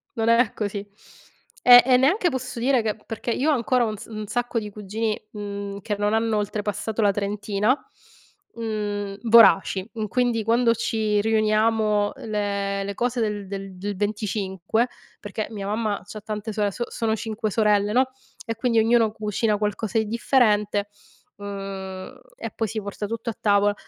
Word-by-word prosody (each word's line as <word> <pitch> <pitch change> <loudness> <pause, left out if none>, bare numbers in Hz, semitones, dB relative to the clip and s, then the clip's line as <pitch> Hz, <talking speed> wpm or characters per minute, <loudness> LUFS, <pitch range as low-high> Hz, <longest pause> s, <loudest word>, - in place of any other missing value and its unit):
non 225 0 0
è 230 -1 +4
così. 205 -1 -3 0.8
Eh, 245 0 +11
e 255 -1 +5
neanche 345 - +3
posso 255 -3 -4
dire 255 0 +3
che 215 -1 -1
perché 225 +1 -4
io 275 +6 +1
ho - - +4
ancora 245 -1 +2
un 215 - -3
s 215 0 -7
sacco 245 +2 -1
di 210 - -6
cugini, 210 +2 -3
mhmm, 200 -1 -5
che 205 +1 -3
non 205 +1 0
hanno 225 0 +1
oltrepassato 210 +1 -2
la 205 - +4
trentina, 205 +2 0 0.8
mhmm, 205 -3 -3
voraci. 195 -3 +6
Mhmm, 220 -2 -3
quindi, 240 0 +1
quando 230 +1 +3
ci 220 -2 0
riuniamo, 215 -1 +2
le 200 -2 -2
le 200 - -4
cose 245 +2 -1
del 210 -3 -2
del 195 -1 -6
del 200 +2 -4
25, 205 +1 -1 0.3
perché 210 0 -4
mia 200 -2 -5
mamma 215 -1 -1
c'ha 215 +2 -9
tante 215 +1 -5
sore 210 -1 0
s 240 +5 -3
sono 220 -1 -1
5 220 0 -3
sorelle, 210 -1 +2
no, 260 +2 +3 0.3
e 230 -1 -3
quindi 230 -1 +2
ognuno 225 0 +4
cucina 210 0 0
qualcosa 210 +1 -1
di 220 - 0
differente, 210 -3 +2 0.5
uhm, 195 -2 -7 0.2
e - - -6
poi 225 - -2
si 215 +1 -4
porta 200 +1 -5
tutto 230 +2 -4
a 225 - -6
tavola. 205 -1 +3
215 Hz, 165 wpm, -24 LUFS, 205-230 Hz, 0.8 s, Eh